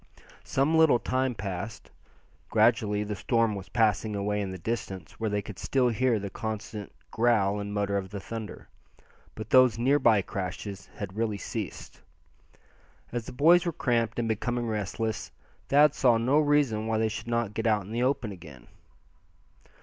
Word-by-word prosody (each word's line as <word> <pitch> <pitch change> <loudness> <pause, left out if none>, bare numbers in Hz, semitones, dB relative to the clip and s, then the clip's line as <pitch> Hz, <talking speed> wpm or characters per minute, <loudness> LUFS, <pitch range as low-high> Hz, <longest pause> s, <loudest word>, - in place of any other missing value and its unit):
Some 155 +4 +2
little 160 -6 +6
time 130 +1 -1
passed. 95 +2 -6 0.6
Gradually 110 -2 +3
the 105 0 -4
storm 115 +1 +1
was 95 -2 -7
passing 110 -2 +1
away 105 +1 -1
in 100 - -3
the 95 - -6
distance, 95 -1 -5
where 110 -1 -1
they 105 0 -1
could 100 -3 -9
still 130 -2 +1
hear 120 0 +1
the 100 -1 -5
constant 110 -1 -5 0.2
growl 105 -3 +2
and 100 0 -5
mutter 100 -1 0
of 95 -1 -4
the 100 +1 -6
thunder. 110 +1 -7 0.7
But 110 0 -8
those 130 -3 +6
near 135 +5 +3
by 110 -7 +4
crashes 95 +1 -6
had 100 -2 -6
really 110 -2 -1
ceased. - - -6 1.1
As 120 -1 -4
the - - -6
boys 165 +7 +5
were 170 - -1
cramped, 120 -6 0
and 120 -1 0
becoming 120 +2 -1
restless, 110 0 -3 0.4
Thad 145 +1 +5
saw 120 -5 +4
no 130 +6 +3
reason 145 -8 +2
why 110 -1 +1
they 110 0 +2
should 110 +1 -6
not 115 -3 -1
get 115 +2 -1
out 105 -2 +2
in 105 - -10
the 120 +2 -1
open 125 -4 0
again. 80 -9 -12
110 Hz, 170 wpm, -28 LUFS, 100-120 Hz, 1.1 s, little